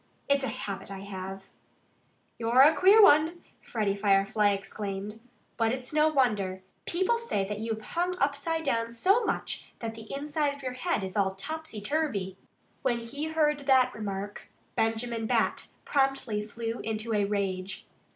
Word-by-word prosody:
It's 280 -1 +3
a - - 0
habit 200 -5 -5
I 195 -1 -7
have." 195 -1 -7 0.9
"You're 235 +3 +5
a 305 +3 +7
queer 395 +7 +7
one!" 320 -1 +5 0.2
Freddie 210 -4 -1
Firefly 200 +1 +3
exclaimed. 200 +1 -3 0.4
"But 225 -1 +2
it's 255 +2 -5
no 305 0 +5
wonder. 210 -10 +1 0.2
People 375 +7 +1
say 335 - -1
that 205 +1 -4
you've 220 0 -3
hung 355 +6 -1
upside 295 +2 0
down 230 -5 0
so 390 - +3
much - - -3
that 225 -1 -5
the 225 -1 -11
inside 290 +1 -1
of 280 - -14
your 255 -1 -3
head 255 - -1
is 190 +1 -5
all 190 -2 +1
topsy 310 0 -6
turvy." 210 -7 -1 0.5
"When 240 -3 0
he 280 +6 -5
heard 310 -2 +1
that 255 -2 +5
remark 205 -1 -5 0.3
Benjamin 225 0 0
Bat - - +1 0.2
promptly 270 -6 +1
flew 230 +2 -4
into 220 +1 -3
a 205 -1 +2
rage. 195 -2 -2
230 Hz, 155 wpm, -29 LUFS, 205-290 Hz, 0.9 s, a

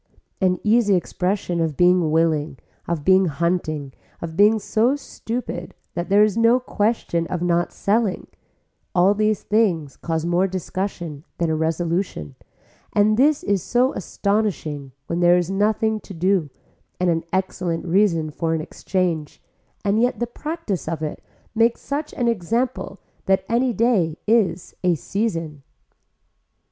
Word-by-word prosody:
An 180 -1 +3
easy 215 -2 +4
expression 180 -1 -1
of 160 -3 -1
being 180 -2 +4
willing, 155 -3 +1 0.3
of 165 -4 -2
being 190 0 +5
hunting, 155 -3 -1 0.3
of 160 -1 -6
being 210 +4 +5
so 225 +5 +1
stupid 235 -9 -6 0.2
that 175 +1 -4
there 205 +2 +6
is 215 -2 +2
no 230 +2 +4
question 205 -8 -1
of 175 -1 -3
not 175 0 +1
selling, 210 -1 0 0.7
all 185 +3 +5
these 215 0 0
things 185 -10 +1
cause 160 -1 -2
more 175 +2 +2
discussion 185 -4 -4
than 170 -2 0
a - - +1
resolution 165 - -2 0.6
and 210 +1 +4
this 285 +5 +3
is 200 -2 +1
so 250 +7 +1
astonishing 190 -8 -2
when 170 +3 -2
there 175 0 +5
is 175 +1 -1
nothing 215 +2 +1
to 195 - -11
do 180 -2 +1 0.5
and 180 -1 +2
an 165 0 -1
excellent 180 -2 -2
reason 170 -4 +2
for 165 +1 -1
an - - -1
exchange, 165 -2 -2 0.5
and 205 +2 +2
yet 245 +1 +1
the 240 - +1
practice 270 - -4
of 160 -1 -3
it 150 - -5 0.3
makes 230 +1 +2
such 290 +2 -4
an 245 - 0
example 230 0 -1 0.3
that 190 0 +2
any 245 +2 +2
day 210 -9 +1
is 200 -6 +1
a 180 -1 +3
season. 165 - -3
185 Hz, 145 wpm, -22 LUFS, 165-215 Hz, 0.7 s, there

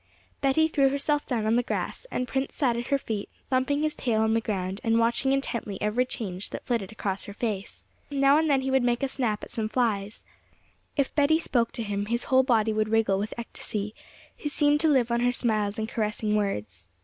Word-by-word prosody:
Betty 280 +4 +3
threw 280 -4 +3
herself 285 +2 0
down 230 -5 -1
on 225 +2 +3
the - - +4
grass, 255 - -4
and 250 - -2
Prince 265 +1 -2
sat 250 -5 +2
at 240 +1 -3
her 280 - +2
feet, 220 -6 -4 0.2
thumping 265 +3 +1
his 310 -1 +1
tail 225 -3 0
on 220 0 +2
the 225 - +2
ground, 195 -2 -3
and 225 -1 +3
watching 235 +4 +2
intently 235 -7 -2
every 235 +4 +1
change 195 -6 -4
that - - -7
flitted 225 -5 -1
across 195 -3 -3
her 200 - -9
face. 210 -2 -4 0.2
Now 280 +1 +4
and 320 0 +1
then 275 -2 +3
he 265 0 -2
would 265 0 +4
make 240 +1 +1
a - - +3
snap 240 -6 -1
at - - -8
some 220 -1 -2
flies; 215 -3 -1 0.7
if 280 -2 +1
Betty 300 +1 +4
spoke 240 -8 0
to 230 - -2
him, 205 -1 -2
his 235 +2 0
whole 260 0 +4
body 225 -4 +2
would 215 0 0
wriggle 215 -3 +2
with 210 +2 -3
ecstasy; 210 -3 -5 0.4
he 295 - -4
seemed 295 0 +3
to 320 - +2
live 255 -6 +3
on 235 - +2
her 245 +1 +3
smiles 215 -4 0
and 220 0 -2
caressing 215 -1 -1
words. 105 - -3
235 Hz, 220 wpm, -27 LUFS, 215-270 Hz, 0.7 s, the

